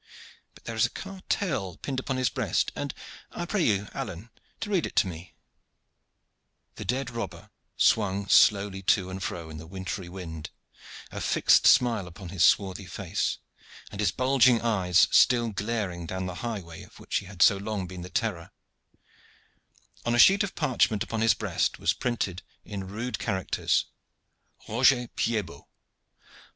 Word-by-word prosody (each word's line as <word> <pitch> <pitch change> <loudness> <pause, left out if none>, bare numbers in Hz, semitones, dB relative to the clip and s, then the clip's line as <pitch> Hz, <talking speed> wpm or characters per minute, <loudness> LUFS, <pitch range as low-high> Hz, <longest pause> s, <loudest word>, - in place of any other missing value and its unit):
But - - -17
there 115 - -5
is 110 - +2
a - - -14
cartel 185 - -3
pinned 135 -2 -3
upon 130 0 -3
his 130 -1 +1
breast, - - 0
and - - -3 0.4
I 175 - -5
pray 195 +2 -1
you, 105 - +1
Alleyne, 100 +4 -6 0.3
to 210 - -4
read 185 -5 +1
it - - -12
to - - +4
me." 85 -2 -9 1.4
The - - -6
dead 125 +1 -2
robber 115 -1 -6 0.3
swung 100 -2 +2
slowly 100 -2 +4
to 95 0 +2
and 95 +1 -6
fro 85 -3 -5
in 80 - -8
the 80 - -10
wintry 95 0 -5
wind, 80 -4 -7 0.6
a - - -6
fixed - - +4
smile 115 -7 +4
upon 90 +1 -10
his 90 -2 0
swarthy 95 0 +2
face, 90 -1 -2 0.5
and 100 - -9
his 100 -4 +2
bulging 130 -2 +4
eyes 95 -6 +3
still 120 -2 +5
glaring 100 -5 -3
down 95 +2 -3
the 90 - -4
highway 100 -9 -5
of - - -15
which - - -2
he 100 - -5
had 90 -2 +1
so 100 - +6
long 100 -1 -3
been 90 0 -8
the 90 - -8
terror; 95 -6 -2 1.5
on 120 - +1
a - - +1
sheet 195 - +7
of 200 - -5
parchment 125 - +1
upon 115 -1 -3
his 110 -2 +4
breast - - -1
was - - +1
printed 100 -8 -2 0.2
in 95 -2 -6
rude 110 +6 -4
characters; 95 -4 0 0.8
ROGER 125 +1 +3
PIED 110 -4 -1
BOT. 70 -4 -14
100 Hz, 165 wpm, -27 LUFS, 90-120 Hz, 1.5 s, sheet